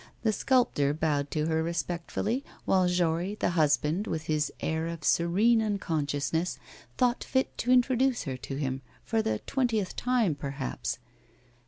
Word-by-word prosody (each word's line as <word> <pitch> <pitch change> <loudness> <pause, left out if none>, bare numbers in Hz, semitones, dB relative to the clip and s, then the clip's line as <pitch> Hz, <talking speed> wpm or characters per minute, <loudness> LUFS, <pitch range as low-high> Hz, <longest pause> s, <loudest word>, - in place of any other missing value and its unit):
The 220 -2 +2
sculptor 220 - +2
bowed 150 -3 0
to 155 -1 -1
her 160 0 +1
respectfully, 175 +8 -2 0.2
while 185 -1 +3
Jory, 180 +2 +1
the 195 - 0
husband, 155 +3 +2
with 155 - -2
his 155 -1 0
air 160 0 -1
of 165 -2 -6
serene 205 +10 +3
unconsciousness, 160 - -1 0.4
thought 250 -1 +2
fit 260 0 0
to 245 - +1
introduce 255 0 +3
her 135 -3 -3
to 135 +1 -6
him, 135 -2 -2 0.2
for 225 -1 +1
the 110 - 0
twentieth 235 -8 0
time, 240 -8 +2
perhaps. 140 -2 -4
170 Hz, 145 wpm, -29 LUFS, 150-225 Hz, 0.4 s, while